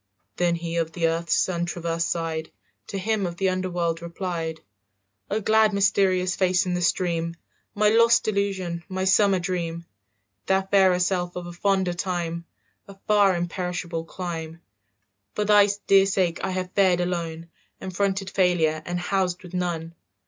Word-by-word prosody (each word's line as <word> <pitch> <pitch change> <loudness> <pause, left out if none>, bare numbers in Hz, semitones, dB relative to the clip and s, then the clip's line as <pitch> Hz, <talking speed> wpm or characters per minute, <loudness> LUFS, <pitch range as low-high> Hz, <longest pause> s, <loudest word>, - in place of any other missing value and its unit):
Then 175 -1 +2
he 170 0 -4
of 165 -1 -1
the 165 -2 +1
earth's 165 +1 0
sun 175 -2 0
traversed 170 -1 -2
side 160 -1 -3 0.4
To 200 - -5
him 210 -1 0
of 170 0 -7
the 190 0 +1
under 185 0 -2
world 170 -2 -1
replied, 170 -2 -4 0.7
"O 210 - 0
glad 220 0 +3
mysterious 190 -2 +2
face 185 0 +2
in 180 - -1
the 180 - -1
stream, 170 -1 0 0.4
My 210 0 +4
lost 230 +1 +4
illusion, 195 -5 -1
my 190 0 -2
summer 195 +1 +4
dream, 170 -2 -3 0.6
"Thou 190 0 +2
fairer 190 -2 +4
self 180 -1 -1
of 180 -1 -5
a 175 - -8
fonder 190 0 +1
time, 170 -2 -3 0.4
A 200 -1 -12
far 205 -3 +4
imperishable 175 -1 -3
clime, 165 -2 -6 0.7
"For 210 - 0
thy 205 -1 +6 0.2
dear 195 0 +5
sake 185 -3 0
I 190 - 0
have 185 -1 -3
fared 185 -3 +3
alone 170 -2 -3 0.3
And 185 -1 -7
fronted 195 0 -1
failure 165 -4 +2
and 175 +2 -3
housed 180 0 -1
with 180 0 -12
none. 170 -2 -3
180 Hz, 160 wpm, -24 LUFS, 170-195 Hz, 0.7 s, thy